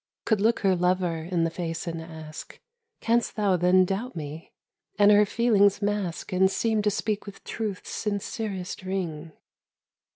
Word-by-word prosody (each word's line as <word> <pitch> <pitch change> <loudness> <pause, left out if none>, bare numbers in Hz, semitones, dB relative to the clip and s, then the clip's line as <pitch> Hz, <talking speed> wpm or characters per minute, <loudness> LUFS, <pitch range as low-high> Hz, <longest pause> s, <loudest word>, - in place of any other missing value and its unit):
— - - -67
Could 215 -3 +2
look 225 +2 +2
her 195 -2 +3
lover 180 -1 +1
in 165 +1 -1
the 165 - 0
face 165 -1 -4
and 165 -1 -4
ask 160 -1 -10 0.4
"Canst 235 +1 +1
thou 205 -3 +2
then 180 +1 +4
doubt 205 +7 -3
me?" 155 0 -7 0.5
and 205 +1 +6
her 210 0 +6
feelings 205 -4 +3
mask 205 -4 -2
And 190 +1 +4
seem 220 +2 +1
to 210 - +2
speak 210 0 -2
with 200 - -10
truth's 215 -4 -5
sincerest 200 -2 -3
ring. 175 -4 -4
190 Hz, 160 wpm, -26 LUFS, 170-210 Hz, 0.5 s, and